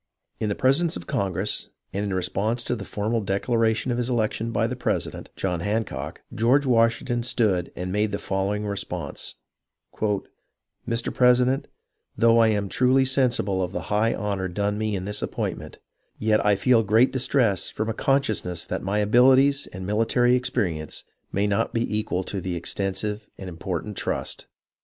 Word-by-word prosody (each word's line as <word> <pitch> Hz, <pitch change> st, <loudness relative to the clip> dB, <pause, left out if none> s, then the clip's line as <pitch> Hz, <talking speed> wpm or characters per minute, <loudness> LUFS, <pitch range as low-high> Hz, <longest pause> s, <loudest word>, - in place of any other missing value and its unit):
In 110 Hz, -, -1 dB
the 100 Hz, -, -1 dB
presence 140 Hz, -, +2 dB
of 85 Hz, -, -9 dB
Congress, 95 Hz, +1 st, -1 dB, 0.2 s
and 100 Hz, +2 st, -1 dB
in 100 Hz, -, -2 dB
response 100 Hz, +6 st, -1 dB
to 125 Hz, -, -1 dB
the 100 Hz, -4 st, -7 dB
formal 110 Hz, +2 st, -1 dB
declaration 110 Hz, +4 st, 0 dB
of 120 Hz, -, -1 dB
his 120 Hz, +1 st, -1 dB
election 115 Hz, -1 st, 0 dB
by 115 Hz, 0 st, +1 dB
the 125 Hz, +2 st, -2 dB
president, 125 Hz, -, -2 dB
John 90 Hz, -3 st, -1 dB
Hancock, 105 Hz, +5 st, -3 dB
George 130 Hz, +6 st, +3 dB
Washington 120 Hz, 0 st, +2 dB
stood 110 Hz, -7 st, +1 dB
and 90 Hz, +1 st, -4 dB
made 105 Hz, +2 st, +1 dB
the 100 Hz, -, -1 dB
follow 95 Hz, +1 st, -1 dB
ing 105 Hz, 0 st, -3 dB
response: 90 Hz, -7 st, -4 dB, 1.5 s
"Mr. 115 Hz, 0 st, 0 dB
President, 125 Hz, +1 st, +3 dB, 0.3 s
— -, -, -43 dB
Though 115 Hz, 0 st, +5 dB
I 115 Hz, -, +6 dB
am 105 Hz, -2 st, +1 dB
truly 130 Hz, +5 st, +3 dB
sen 130 Hz, -1 st, +3 dB
sible 95 Hz, -5 st, 0 dB
of 90 Hz, +1 st, -4 dB
the 90 Hz, -, -2 dB
high 110 Hz, +2 st, +2 dB
honour 100 Hz, -3 st, -2 dB
done 100 Hz, +3 st, -1 dB
me 110 Hz, -1 st, -1 dB
in 95 Hz, -1 st, -4 dB
this 105 Hz, +1 st, -3 dB
appointment, -, -, -4 dB, 0.4 s
yet, 110 Hz, 0 st, +2 dB
I 105 Hz, -1 st, +4 dB
feel 115 Hz, +4 st, +4 dB
great 110 Hz, +4 st, +4 dB
distress 125 Hz, -6 st, +1 dB
from 110 Hz, -, -3 dB
a 115 Hz, -, -1 dB
consciousness 110 Hz, -, 0 dB
that -, -, -3 dB
my 100 Hz, +2 st, -1 dB
abilities 130 Hz, +6 st, +4 dB
and 95 Hz, 0 st, -8 dB
military 115 Hz, +4 st, +3 dB
experience 85 Hz, -, -1 dB, 0.3 s
may 100 Hz, +1 st, +1 dB
not 110 Hz, +4 st, 0 dB
be 115 Hz, -2 st, 0 dB
equal 105 Hz, -4 st, -1 dB
to 95 Hz, +1 st, -4 dB
the 90 Hz, 0 st, -3 dB
extensive 100 Hz, +4 st, -2 dB
and 95 Hz, -, -8 dB
important 90 Hz, +3 st, -4 dB
trust. -, -, -3 dB
105 Hz, 170 wpm, -25 LUFS, 95-120 Hz, 1.5 s, I